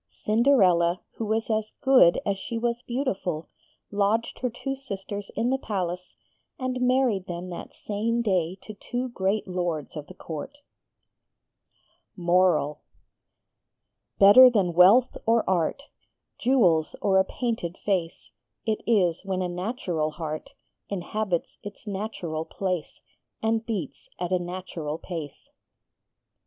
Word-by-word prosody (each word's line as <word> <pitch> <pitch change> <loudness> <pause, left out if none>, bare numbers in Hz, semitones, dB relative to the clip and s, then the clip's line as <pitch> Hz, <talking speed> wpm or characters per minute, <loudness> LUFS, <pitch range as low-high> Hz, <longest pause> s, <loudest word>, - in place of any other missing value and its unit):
Cinderella, 190 -7 +3 0.2
who 225 - -2
was 220 +1 0
as 215 0 -1
good 255 -10 +6
as 200 -1 -1
she 230 +4 -4
was 235 +1 -1
beautiful, 205 - -3 0.4
lodged 205 +3 0
her 250 - 0
two 270 +3 -4
sisters 205 -6 -6
in 240 +2 +1
the 265 - +1
palace, 180 -5 -4 0.4
and 255 -1 -2
married 250 -6 +2
them 175 +1 -5
that 175 - -8
same 230 +3 -1
day 185 -4 0
to 215 - -8
two 245 +5 -4
great 200 -2 -1
Lords 175 -5 -3
of 150 -2 -6
the - - -12
Court. 160 - -7 1.6
MORAL 170 -5 +2 1.4
Better 230 +6 +9
than 195 -7 +1
wealth 195 +9 +6
or 230 0 +3
art, 185 - 0 0.6
Jewels 185 -12 +3
or 190 -1 +3
a - - +5
painted 210 -5 -3
face, 175 - -2 0.3
It 220 -1 0
is 185 -8 +2
when 190 -1 -2
a - - -1
natural 180 -4 -2
heart 155 -1 -6 0.3
Inhabits 200 -1 -2
its 205 +1 -10
natural 190 -6 -4
place 185 -4 -4 0.4
_And 225 0 +1
beats 215 -6 -5
at 180 0 -3
a 185 - +3
natural 175 -4 -5
pace. 165 -5 -7
195 Hz, 125 wpm, -26 LUFS, 175-230 Hz, 1.6 s, Better